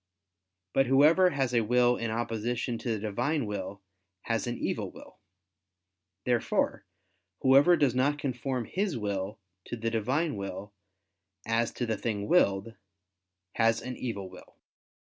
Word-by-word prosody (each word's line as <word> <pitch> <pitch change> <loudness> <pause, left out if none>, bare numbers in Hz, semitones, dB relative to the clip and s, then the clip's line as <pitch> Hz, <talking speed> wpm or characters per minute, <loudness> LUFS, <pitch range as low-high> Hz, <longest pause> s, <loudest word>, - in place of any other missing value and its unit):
But 135 -1 +3
whoever 155 +8 +6
has 135 -6 -1
a 120 - +4
will 120 +2 +3
in 115 -1 -3
opposition 115 +1 -2
to 125 - -4
the - - -1
Divine 115 +8 -1
will, 100 -1 -5 0.4
has 115 +1 -1
an 120 - -2
evil - - -2
will. - - -14 1.1
Therefore 120 -2 0 0.5
whoever 140 +7 +6
does 140 -5 +3
not 135 +3 +2
conform 130 -2 -2
his 190 -7 -2
will 100 -1 -3 0.3
to - - -5
the 115 0 -2
Divine 130 +7 0
will, 100 +1 -6 0.7
as 115 +1 +1
to 125 - -2
the 110 -2 -1
thing 105 -2 -3
willed, 115 - +2 0.8
has 115 0 +3
an 125 0 -5
evil 100 -7 -4
will. - - -14
120 Hz, 140 wpm, -29 LUFS, 110-135 Hz, 1.1 s, whoever